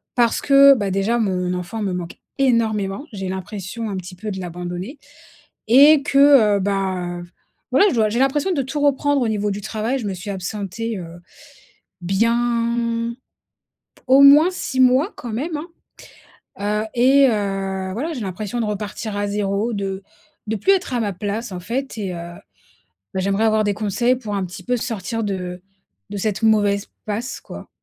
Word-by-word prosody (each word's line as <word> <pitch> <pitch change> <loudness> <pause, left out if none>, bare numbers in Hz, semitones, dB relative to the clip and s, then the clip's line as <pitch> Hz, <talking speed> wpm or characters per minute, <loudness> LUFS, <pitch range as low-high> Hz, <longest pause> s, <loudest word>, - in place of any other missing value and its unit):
parce 240 -2 +2
que, 275 0 +7
bah, 200 -5 -2
déjà 195 +5 +1
mon 180 -4 0
enfant 180 +5 -5
me 195 -3 -1
manque 175 -1 -6 0.2
énormément. 220 -3 +1
J'ai 190 -2 -4
l'impression 200 +4 -5
un 195 - -4
petit 180 0 -8
peu 210 +4 -6
de 190 - -5
l'abandonner 180 - -6 0.7
et 280 +5 +7
que, 275 -1 0
heu, 265 -8 +6
bah, 185 -3 -2
v 175 - -13 0.4
voilà, 405 - +5
je - - -2
dois, 220 -2 +3
j'ai 220 +3 -2
l'impression 280 +6 +1
de 280 - 0
tout 270 +3 -4
reprendre 285 0 +2
au 235 - +1
niveau 210 -1 -1
du 205 - -5
travail, 220 +5 -2
je 230 - -5
me 195 - -3
suis 195 +3 -7
absentée, 200 +3 -4
heu, 170 -1 -9 0.8
bien, 230 +3 0 0.9
au 265 +2 +6
moins 295 +5 +8
6 270 -7 -4
mois 260 - +4
quand 235 -3 -7
même, 300 +8 -3
hein. 310 +4 -7 0.9
Heu 210 +1 0
et 270 +3 +5
heu, 195 -3 -2
voilà, 305 - -3
j'ai 250 - -5
l'impression 205 +4 -4
de - - -1
repartir 210 0 -4
à 205 0 -1
0, 205 +2 -1
de 195 -2 -3 0.5
de 220 - -1
plus 220 - +3
être 365 -8 -1
à - - +1
ma 205 -4 -1
place 205 +4 -4
en 180 - -5
fait 245 +9 -4
et 195 -3 -3
heu, 170 0 -7 0.8
beh, 190 - 0
j'aimerais 200 +3 +1
avoir 220 -1 +3
des 205 - +1
conseils 215 +4 +1
pour 220 -5 -5
un 195 - -1
petit 180 - -10
peu 250 0 0
sortir 225 -1 -3
de 180 -3 -4 0.5
de - - -5
cette 210 +1 -2
mauvaise 205 -2 +2 0.2
passe 225 +5 -4
quoi - - -10
215 Hz, 180 wpm, -21 LUFS, 195-245 Hz, 0.9 s, moins